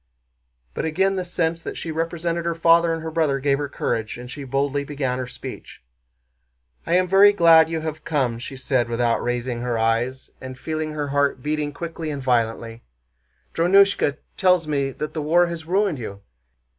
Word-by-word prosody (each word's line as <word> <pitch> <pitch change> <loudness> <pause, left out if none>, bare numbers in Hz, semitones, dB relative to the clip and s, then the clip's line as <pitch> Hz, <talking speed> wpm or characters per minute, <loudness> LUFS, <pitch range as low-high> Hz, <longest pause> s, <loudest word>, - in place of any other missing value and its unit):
But - - -3
again 190 +5 +1
the 185 - -2
sense 165 -2 -1
that - - -6
she 165 - -5
represented 165 +1 -2
her 170 0 -1
father 165 0 +4
and 165 -1 -3
her 160 - -4
brother 155 -4 +1
gave 140 0 +1
her 145 -1 -3
courage, 115 -4 -3
and 125 +1 -9
she 145 - -7
boldly 140 +2 -1
began 135 -3 -3
her 130 - -4
speech. - - -9 1.1
"I 170 - +2
am 185 0 +3
very 195 +3 +7
glad 165 -4 +6
you 165 -1 -2
have 155 0 -5
come," 130 -7 -1
she 135 +2 -8
said 130 -2 0
without 120 0 +1
raising 120 0 -2
her 120 -1 -1
eyes, 115 +4 -1
and 130 0 -8
feeling 155 +1 -4
her 145 -2 -3
heart 140 -2 0
beating 150 0 -1
quickly 165 +1 -6
and 145 -2 -4
violently. 115 -2 -1 0.7
"Drónushka 180 -3 +3 0.2
tells 180 -4 +3
me 140 -2 0
that 150 +3 -6
the 155 - -3
war 170 +4 +3
has 170 -2 -6
ruined 190 -4 +1
you. 100 -4 -7
150 Hz, 180 wpm, -22 LUFS, 130-165 Hz, 1.1 s, very